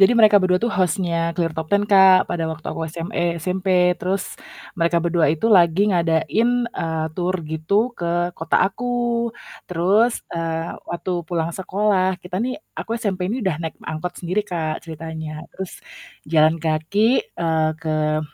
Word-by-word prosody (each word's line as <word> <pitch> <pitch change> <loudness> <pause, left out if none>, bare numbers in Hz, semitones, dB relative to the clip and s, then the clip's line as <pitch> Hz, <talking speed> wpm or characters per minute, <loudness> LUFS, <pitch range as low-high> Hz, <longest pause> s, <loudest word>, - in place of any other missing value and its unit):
Jadi 195 +4 +7
mereka 215 -2 +7
berdua 185 0 +2
tuh 235 - +1
host-nya 170 -2 0
ClearTtop 160 -2 -2
10, 205 +1 +2
Kak, 190 -2 +7
pada 170 -2 -1
waktu 155 0 -10
aku - - -5
SM 165 +2 -6
eee, 170 -1 0
SMP. 180 -1 +2
Terus 190 +1 -2 0.4
mereka 170 0 +2
berdua 170 -2 +2
itu 160 +8 -1
lagi 180 +2 +5
ngadain, 170 +6 +2 0.2
eee, 160 -8 -3
tur 180 +1 -1
gitu 200 +10 0
ke 175 0 0
kota 165 0 +1
aku. 240 +1 -1 0.4
Terus, 195 +7 +2
eee, 165 0 -3
waktu 175 +1 -3 0.2
pulang 165 -2 -1
sekolah 190 0 0
kita 180 0 -5
nih 255 +4 -4 0.2
aku 225 - -4
SMP 190 -5 -1
ini 255 - -2
udah 175 -5 0
naik 160 - -5
angkot 160 +3 -4
sendiri 185 +4 0
Kak 165 -5 -3
ceritanya. 160 -1 -7
Terus 190 -1 -6 0.6
jalan 155 0 +4
kaki, 195 - +1
eee, 160 -1 +1
ke 155 -1 0
175 Hz, 155 wpm, -21 LUFS, 160-195 Hz, 0.6 s, Jadi